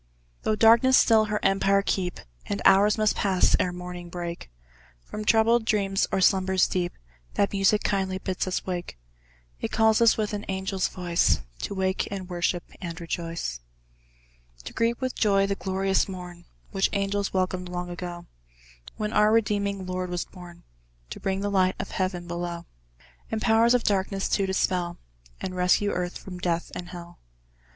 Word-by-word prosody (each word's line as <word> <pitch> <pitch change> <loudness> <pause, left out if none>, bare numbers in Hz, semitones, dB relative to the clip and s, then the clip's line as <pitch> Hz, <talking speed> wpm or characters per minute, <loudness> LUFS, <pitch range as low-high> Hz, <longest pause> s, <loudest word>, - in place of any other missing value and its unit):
Though 215 - +1
Darkness 230 +4 +6
still 220 -2 +5
her 210 0 -1
empire 195 0 +3
keep, 180 -3 -1 0.3
And 100 - -2
hours 205 +3 +6
must 215 -1 +2
pass, 190 -2 +3
ere 180 - +1
morning 180 0 -7
break; 170 - -6 0.6
From 215 - -6
troubled 225 +2 +4
dreams, 200 -3 +1
or 190 - +1
slumbers 190 -1 +3
deep, 175 -1 -2 0.4
That 200 - +2
music 200 +1 +3
KINDLY 190 -1 0
bids 190 0 -3
us 185 - -2
wake: 175 - -4 0.6
It - - -3
calls 220 0 +3
us, 230 - +5
with 215 -1 -1
an 205 0 -3
angel's 190 0 -1
voice, 175 - +1 0.2
To 200 - -4
wake, 190 0 0
and 195 -2 -5
worship, 175 0 0 0.2
and 170 -1 -5
rejoice; 165 - -4 1.0
To - - -8
greet 230 +1 0
with 255 -1 -2
joy 195 -2 +3
the 200 - 0
glorious 195 0 0
morn, 180 -2 -8 0.3
Which 195 -1 +1
angels 200 0 -1
welcomed 185 -1 -1
long 180 0 -4
ago, 175 -1 -6 0.7
When 215 0 -3
our 210 0 +4
redeeming 200 -3 +1
Lord 185 0 -3
was 175 -1 -2
born, 175 -1 -13 0.5
To - - -6
bring 195 0 -1
the 205 0 -1
light 185 -1 +2
of - - -6
Heaven 185 -2 -2
below; 175 0 -5 0.6
The 220 - -2
Powers 225 +2 +4
of 245 - +1
Darkness 195 -1 0
to 195 -1 +1
dispel, 180 -2 0 0.4
And 185 - -5
rescue 180 +3 +2
Earth 175 0 -3
from 180 -2 -9
Death 175 -1 -1
and 175 0 -6
Hell. 175 -1 -10
190 Hz, 165 wpm, -26 LUFS, 180-205 Hz, 1.0 s, Darkness